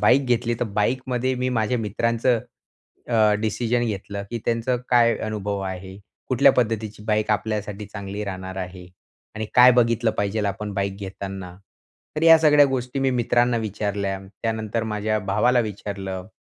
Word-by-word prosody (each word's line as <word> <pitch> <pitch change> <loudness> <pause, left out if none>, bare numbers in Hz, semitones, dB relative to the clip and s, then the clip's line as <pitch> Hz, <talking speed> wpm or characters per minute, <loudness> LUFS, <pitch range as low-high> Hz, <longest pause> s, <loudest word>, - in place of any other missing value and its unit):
Bike 135 +2 +4
घेतली, 120 -1 +1
तर - - +2
बाईकमध्ये 125 +4 -1
मी 125 0 -1
माझ्या 115 +3 0
मित्रांचं 115 +2 0 0.7
अ, 110 -3 +4
डिसिजन 120 +2 0
घेतलं 100 -1 -4
की 120 - -3
"त्यांचा 120 +2 0
काय 120 -1 +4
अनुभव 105 -2 -3
आहे? 95 0 -6 0.3
कुठल्या - - +5
पद्धतीची 110 -3 -1
बाईक 110 0 +1
आपल्यासाठी 105 -1 -2
चांगली 100 0 -6
राहणार 95 -1 -6
आहे 90 -1 -6 0.5
आणि 110 0 -4
काय 125 +1 +9
बघितलं 115 -1 +3
पाहिजेल 105 0 -1
आपण 100 +1 -4
बाईक 100 0 -2
घेताना?" 95 -2 -7 0.6
तर 155 - -2
ह्या 165 0 +8
सगळ्या 150 -2 +6
गोष्टी 130 0 -3
मी 135 0 +2
मित्रांना 120 -1 +2
विचारल्या. 100 -2 -2 0.2
त्यानंतर 110 0 -2
माझ्या 110 0 -1
भावाला 120 +5 +2
विचारलं. 100 -3 -5
110 Hz, 145 wpm, -23 LUFS, 100-120 Hz, 0.7 s, काय